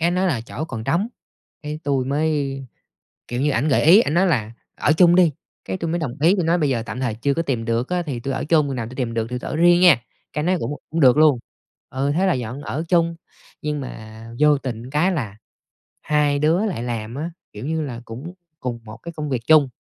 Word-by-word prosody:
Cái 165 - +2
ảnh 175 - 0
nói 185 +1 +1
là 145 -11 0
chỗ 140 +6 -6
còn 115 -8 -6
trống. 185 - +1 0.5
Cái 150 0 -5
tui 135 -3 +1
mới 145 -1 0 0.7
kiểu 120 +1 -2
như, 150 - +2
ảnh 135 +3 +1
gợi 140 - +3
ý, 175 +7 +8
ảnh 150 - -1
nói 185 +3 +4
là 115 -10 0 0.3
"Ở 145 - +3
chung 175 +1 +5
đi!" 175 -3 +5 0.3
Cái - - -3
tui 165 -3 -3
mới 170 - 0
đồng 135 -7 -3
ý, 170 +5 +5
tui 180 -4 0
nói 170 +2 +3
bây 150 -4 +1
giờ 120 -4 0
tạm 115 +3 -6
thời 125 -5 -1
chưa 140 +5 0
có 165 - 0
tìm 125 -8 -2
được 115 +2 -1
á 180 0 0
thì 140 -6 -4
tui 135 +2 -3
ở - - -2
chung, 155 -1 +3
hồi 135 - -3
nào 115 -3 -3
tui 125 - -10
tìm 125 -3 -2
được 115 -1 -1
thì 125 0 -3
tui - - -6
ở - - -3
riêng 175 +2 +5
nha. 175 -5 +8 0.4
Cái - - -2
ảnh - - -2
nói: 185 +2 +2
"Cũng - - -3 0.2
cũng 165 - -1
được 130 -1 +6
luôn." 150 -5 +5 0.5
Ừ, 135 +2 -1
thế 185 +3 +2
là 185 - +3
dọn 125 +2 -4
ở 145 +2 -3
chung. 170 -2 +2 0.5
Nhưng 150 -1 -2
mà 110 -3 -9
vô 150 -1 +5
tình 125 -3 -6
cái 150 +7 +2
là 110 - -4 0.6
hai 150 -1 +1
đứa 165 +8 +2
lại 185 - -3
làm 115 -1 -4
á, 160 +5 -4 0.2
kiểu 105 +4 -7
như 160 0 -1
là, 125 -5 -5
cũng 130 +11 -8 0.3
cùng 120 -2 -4
một 110 +1 -10
cái 170 +9 -8
công 150 -1 -4
việc 130 -4 -1
chung. 155 -4 +6
145 Hz, 255 wpm, -22 LUFS, 125-165 Hz, 0.7 s, ý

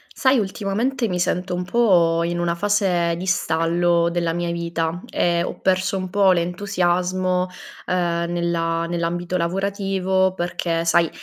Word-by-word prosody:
Sai 265 0 +3
ultimamente 225 +5 -1
mi 180 -3 -2
sento 180 +1 -1
un 180 - -2
po' 180 -6 +3
in 170 +1 -1
una 175 0 0
fase 180 -3 +1
di 180 - -5
stallo 170 -1 +1
della 170 -1 0
mia 175 0 -2
vita, 170 0 -3
ehm, 170 0 +1
ho - - -5
perso 190 +1 +1
un 185 -1 -5
po' 200 -1 +4
l'entusiasmo, 180 0 0 0.4
uhm, 170 -2 0
nella 170 -1 -1
nell'ambito 175 +1 -2
lavorativo 190 +1 0
perché 170 -1 -2
sai, 170 0 +3
175 Hz, 140 wpm, -22 LUFS, 170-190 Hz, 0.4 s, po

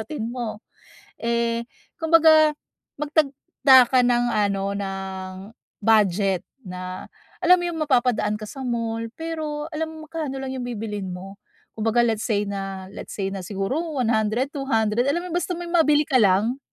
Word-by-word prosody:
routine 220 +1 -5
mo. 235 -3 -5 0.6
Eh, 235 0 0 0.4
kumbaga, 320 -1 +6 0.5
magtakda 275 -3 +4
ka 255 -1 +4
ng 245 0 +3
ano, 200 -2 +1
ng, 190 -1 -5 0.5
budget 200 -3 +2 0.2
na, 185 -1 -7 0.3
alam 360 +1 +7
mo 350 - -3
yung 325 - -5
mapapadaan 240 -5 +2
ka 215 - -10
sa 270 - -8
mall 230 -1 -2
pero 310 -2 -4
alam 320 +1 -3
mo - - -11 0.2
magkano 300 -5 -3
lang 260 - -4
yung 250 - -4
bibilhin 210 -4 -4
mo. 195 +2 -9 0.4
Kumbaga, 225 +2 +2
let's 220 -2 -1
say 205 -2 +1
na 195 -1 -5
let's - - -8
say 195 -1 -2
na 195 - -4
siguro 195 - -2 0.2
₱100, 230 +1 +1
₱200, 240 -4 +1
alam 340 +5 0
mo 360 - -7
basta 355 0 -1
may 350 0 -6
mabili 300 -3 +4
ka 255 - +3
lang. 210 +6 +3
235 Hz, 155 wpm, -23 LUFS, 205-290 Hz, 0.6 s, alam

